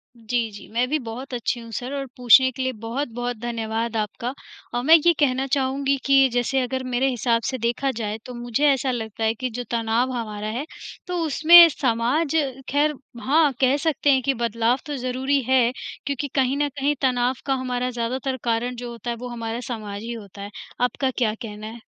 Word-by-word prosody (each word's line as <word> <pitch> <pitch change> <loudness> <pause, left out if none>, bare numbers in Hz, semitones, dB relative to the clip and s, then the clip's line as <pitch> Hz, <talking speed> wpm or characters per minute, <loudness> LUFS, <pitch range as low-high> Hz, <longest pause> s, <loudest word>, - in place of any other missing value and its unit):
जी, 230 0 -2
जी। 205 - -11
मैं 245 +2 +1
भी 310 - +2
बहुत 250 +3 -7
अच्छी 240 0 -2
हूँ 230 -1 -11
सर 250 +5 -4
और 275 -1 -3
पूछने 250 +1 +6
के 260 +1 -6
लिए 260 0 0
बहुत-बहुत 245 -1 -3
धन्यवाद 230 0 -3
आपका। 220 +4 -3 0.4
और 245 - -1
मैं 320 +4 +8
ये 345 - +6
कहना 265 -2 +2
चाहूँगी 275 0 0
कि 270 -1 +6
जैसे 245 +2 +1
अगर 260 +1 -2
मेरे 255 +1 0
हिसाब 235 -2 +1
से 260 - -1
देखा 240 +4 0
जाए, 215 -2 -4
तो 250 - -8
मुझे 240 +3 -1
ऐसा 270 -2 +2
लगता 225 -2 -4
है 220 - +2
कि 255 +3 -4
जो 245 +1 -5
तनाव 235 +2 +1
हमारा 215 -3 -4
है, 240 +7 -3 0.4
तो 360 - -2
उसमें 335 +3 +9
समाज 270 +3 0 0.4
ख़ैर 295 +2 +2 0.3
हाँ, 300 +2 +3
कह 260 +2 +4
सकते 295 -2 +1
हैं 265 - +3
कि 275 - +2
बदलाव 235 0 +1
तो 295 - -4
ज़रूरी 260 +2 0
है 255 -2 +4 0.3
क्योंकि, 280 0 -2
कहीं 265 0 0
न 290 0 +1
कहीं 285 +1 -1
तनाव 250 -1 +2
का 275 - +1
हमारा 250 -1 -2
ज़्यादातर 255 +3 -2
कारण 240 +1 -1
जो 240 0 -6
होता 235 +1 -7
है 235 - -1
वो 250 - -6
हमारा 230 -1 -4
समाज 210 -4 -5
ही 235 - -5
होता 200 -3 -10
है। 205 - -7 0.3
आपका 260 +2 +1
क्या 225 -4 +1
कहना 215 -1 -7
है? 225 +1 -9
250 Hz, 200 wpm, -23 LUFS, 230-270 Hz, 0.4 s, उसमें